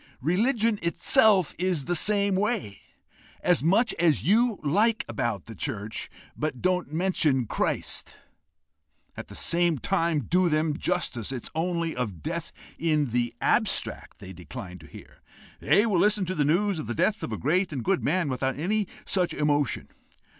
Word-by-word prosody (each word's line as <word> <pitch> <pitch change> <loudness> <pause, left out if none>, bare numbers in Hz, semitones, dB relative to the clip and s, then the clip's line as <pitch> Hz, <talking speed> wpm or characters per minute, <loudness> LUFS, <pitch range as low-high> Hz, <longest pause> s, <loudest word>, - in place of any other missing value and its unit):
Religion 215 - +1
itself 195 - +4
is 180 -6 0
the 175 - 0
same 200 +3 +3
way: 195 - -1 0.6
as 180 -5 +3
much 210 +8 +3
as 165 -5 +2
you 225 +2 +3
like 215 +10 +2
about 110 -4 -3
the 115 - -9
church, 105 +1 -4 0.3
but 150 -4 -3
don't 180 -5 0
mention 155 -6 +1
Christ! - - -2 1.0
At - - -8
the - - -11
same 170 -2 +1
time, 165 -1 0
to - - -10
do 180 +4 +2
them 155 -1 +1
justice, 155 - -2
it 125 -3 -5
is - - -7
only 170 0 -1
of 105 -11 -4
death - - -4 0.3
in 150 -5 +1
the 120 0 -1
abstract - - 0
they 95 - -10
decline 90 +2 -9
to 80 - -14
hear; - - -14 0.4
they 210 - +3
will 200 -6 +1
listen 210 0 +3
to 185 - -2
the 150 -5 +1
news 180 +4 +1
of 155 - -5
the 120 - -3
death 210 - +1
of - - -5
a 110 - -3
great 180 - 0
and 135 -5 -4
good 195 -1 0
man, 170 +2 +1
without 130 0 -2
any 200 +6 0 0.2
such 180 -3 0
emotion. 145 -3 0
170 Hz, 170 wpm, -26 LUFS, 135-190 Hz, 1.0 s, itself